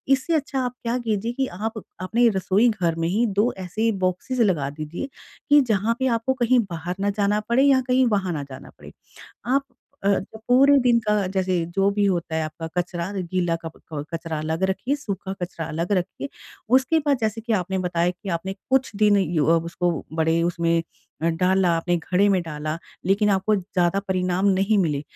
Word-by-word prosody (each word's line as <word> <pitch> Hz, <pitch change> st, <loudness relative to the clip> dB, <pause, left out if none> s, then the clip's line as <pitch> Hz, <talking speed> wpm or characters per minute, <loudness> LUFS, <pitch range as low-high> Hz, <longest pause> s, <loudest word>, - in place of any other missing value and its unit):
इससे 265 Hz, +6 st, -3 dB
अच्छा 285 Hz, -2 st, -1 dB
आप 250 Hz, -, -3 dB
क्या 235 Hz, +1 st, 0 dB
कीजिए 225 Hz, -1 st, -1 dB
कि 265 Hz, +1 st, -1 dB
आप 220 Hz, +4 st, -5 dB, 0.2 s
अपने 230 Hz, +6 st, +2 dB
रसोई 195 Hz, +3 st, +2 dB
घर 180 Hz, -7 st, 0 dB
में 165 Hz, 0 st, -1 dB
ही 210 Hz, +7 st, +1 dB
2 230 Hz, +4 st, +3 dB
ऐसे 220 Hz, +5 st, 0 dB
बॉक्सेस 185 Hz, +8 st, -2 dB
लगा 175 Hz, -11 st, +2 dB
दीजिए 155 Hz, -, -6 dB, 0.4 s
कि 290 Hz, 0 st, +7 dB
जहाँ 225 Hz, -1 st, +1 dB
पे 260 Hz, -, +1 dB
आपको 230 Hz, +4 st, 0 dB
कहीं 250 Hz, -1 st, +3 dB
बाहर 175 Hz, +1 st, -4 dB
ना 200 Hz, -, +1 dB
जाना 205 Hz, +1 st, +2 dB
पड़े 255 Hz, +3 st, +4 dB
या 275 Hz, -2 st, +5 dB
कहीं 255 Hz, +1 st, +4 dB
वहाँ 190 Hz, -3 st, -1 dB
ना 145 Hz, -3 st, -3 dB
जाना 135 Hz, -2 st, -11 dB
पड़े। -, -, -12 dB, 0.6 s
आप 275 Hz, +3 st, +2 dB, 0.4 s
अ, -, -, +3 dB, 0.4 s
पूरे 275 Hz, +3 st, +6 dB
दिन 240 Hz, -2 st, +4 dB
का 210 Hz, -2 st, +2 dB
जैसे 185 Hz, -2 st, 0 dB
जो 195 Hz, +1 st, +3 dB
भी 205 Hz, 0 st, +1 dB
होता 170 Hz, -4 st, -1 dB
है 160 Hz, -, 0 dB
आपका 155 Hz, +1 st, -6 dB
कचरा 175 Hz, +1 st, -2 dB
गीला 175 Hz, -2 st, -1 dB
क 165 Hz, -, -4 dB, 0.4 s
कचरा 165 Hz, -1 st, -3 dB
अलग 160 Hz, +3 st, -3 dB
रखिए, 245 Hz, +8 st, -1 dB
सूखा 200 Hz, -8 st, -5 dB
कचरा 170 Hz, -2 st, -4 dB
अलग 170 Hz, +5 st, -2 dB
रखिए। 195 Hz, +8 st, -2 dB, 0.5 s
उसके 270 Hz, +5 st, +2 dB
बाद 280 Hz, -3 st, +3 dB
जैसे 220 Hz, 0 st, -1 dB
कि 230 Hz, +1 st, -3 dB
आपने 190 Hz, -2 st, 0 dB
बताया 175 Hz, -1 st, 0 dB
कि 180 Hz, +2 st, -10 dB
आपने 185 Hz, +2 st, -2 dB, 0.2 s
कुछ 265 Hz, -3 st, +2 dB
दिन 210 Hz, 0 st, +4 dB
य 175 Hz, -3 st, 0 dB
ओ 165 Hz, +3 st, +4 dB
उसको 170 Hz, +1 st, -1 dB, 0.3 s
बड़े 160 Hz, +1 st, +2 dB
उसमें 170 Hz, -1 st, +1 dB, 0.4 s
अ, 165 Hz, -, +2 dB
डाला 180 Hz, +2 st, +2 dB
आपने 175 Hz, +1 st, 0 dB
घड़े 180 Hz, +4 st, +1 dB
में 195 Hz, -2 st, +3 dB
डाला 155 Hz, -1 st, -4 dB, 0.3 s
लेकिन 205 Hz, +2 st, +3 dB
आपको 195 Hz, +2 st, +2 dB
ज़्यादा 185 Hz, -1 st, 0 dB
परिणाम 185 Hz, 0 st, 0 dB
नहीं 195 Hz, +2 st, +3 dB
मिले। 150 Hz, -6 st, 0 dB
190 Hz, 190 wpm, -23 LUFS, 170-225 Hz, 0.6 s, कि